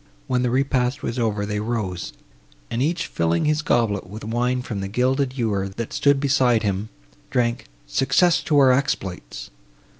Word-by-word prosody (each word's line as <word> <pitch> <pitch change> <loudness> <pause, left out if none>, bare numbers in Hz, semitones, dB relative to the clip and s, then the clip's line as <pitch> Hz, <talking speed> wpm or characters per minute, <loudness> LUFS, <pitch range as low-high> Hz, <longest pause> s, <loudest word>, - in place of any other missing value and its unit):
When 125 -1 0
the 125 - +1
repast 130 0 0
was 115 - -2
over, 105 -3 0
they 105 0 -2
rose, 105 -5 -3 0.6
and, 115 - -1
each 165 +4 0
filling 85 0 0
his 155 0 +2
goblet 115 -9 +1
with 105 +4 -9
wine 125 +3 0
from 110 -5 -4
the 95 - -3
gilded 130 +5 0
ewer, 100 -5 0
that 110 +4 -6
stood 140 -1 +3
beside 130 -5 +3
him, 100 +1 -1 0.4
drank 120 -1 0 0.2
"Success 135 - +3
to 155 -2 +2
our 135 -2 +6
exploits!" 125 -9 -2
120 Hz, 160 wpm, -23 LUFS, 105-135 Hz, 0.6 s, our